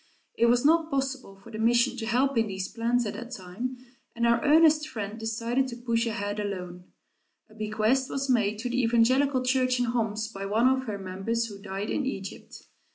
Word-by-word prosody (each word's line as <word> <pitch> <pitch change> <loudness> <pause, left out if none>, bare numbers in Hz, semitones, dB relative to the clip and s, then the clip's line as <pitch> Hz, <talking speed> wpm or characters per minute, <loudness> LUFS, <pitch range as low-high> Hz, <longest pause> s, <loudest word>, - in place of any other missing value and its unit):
It 235 - +3
was 245 +2 +3
not 325 +1 +4
possible 270 -6 -3
for 195 +4 -15
the 220 - -6
mission 240 +3 +3
to 225 -2 -4
help 260 +4 +2
in 225 -1 +2
these 190 -1 -4
plans 235 +1 0
at 210 - -3
that 235 +3 -7
time, 235 +4 -6 0.4
and 235 0 0
our 235 0 +3
earnest 305 0 +5
friend 220 -3 -5
decided 230 +4 -1
to 245 - -6
push 235 -1 -1
ahead 205 -2 -3
alone. 180 -3 -5 0.7
A - - -16
bequest 215 +4 0
was 275 0 -2
made 215 -5 +2
to 240 +3 -4
the 255 +2 +1
evangelical 255 +3 +3
church 255 0 +2
in 245 - +2
Homs 220 -2 -1
by 195 -3 -6
one 225 +5 +3
of 260 0 +1
her 210 -2 -3
members 195 +5 -2
who 205 -3 -9
died 195 +1 -4
in 275 - -1
Egypt. 195 -7 -7
230 Hz, 200 wpm, -27 LUFS, 210-255 Hz, 0.7 s, earnest